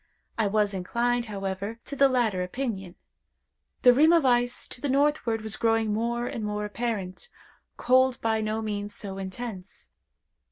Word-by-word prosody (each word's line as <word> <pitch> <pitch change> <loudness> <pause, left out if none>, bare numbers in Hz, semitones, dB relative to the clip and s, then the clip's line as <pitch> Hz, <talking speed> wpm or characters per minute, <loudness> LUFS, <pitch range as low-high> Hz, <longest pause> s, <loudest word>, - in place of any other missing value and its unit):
I 220 -2 +1
was 210 0 +1
inclined, 235 +6 0
however, 200 +1 -4
to 280 - -6
the 275 0 +5
latter 230 -7 +1
opinion. 190 -2 -4 0.9
The 250 -2 +8
rim 305 +6 +5
of 335 -4 +4
ice 245 -1 +1
to 245 - -8
the 285 - -1
northward 275 -5 +1
was 220 -1 -4
growing 225 -2 +1
more 235 +2 -1
and 230 - -4
more 210 0 -2
apparent. 210 - -4 0.5
Cold 255 0 +3
by 220 -1 0
no 215 +1 -2
means 205 -1 -4
so 195 -2 -6
intense. 190 0 -7
225 Hz, 155 wpm, -27 LUFS, 205-245 Hz, 0.9 s, The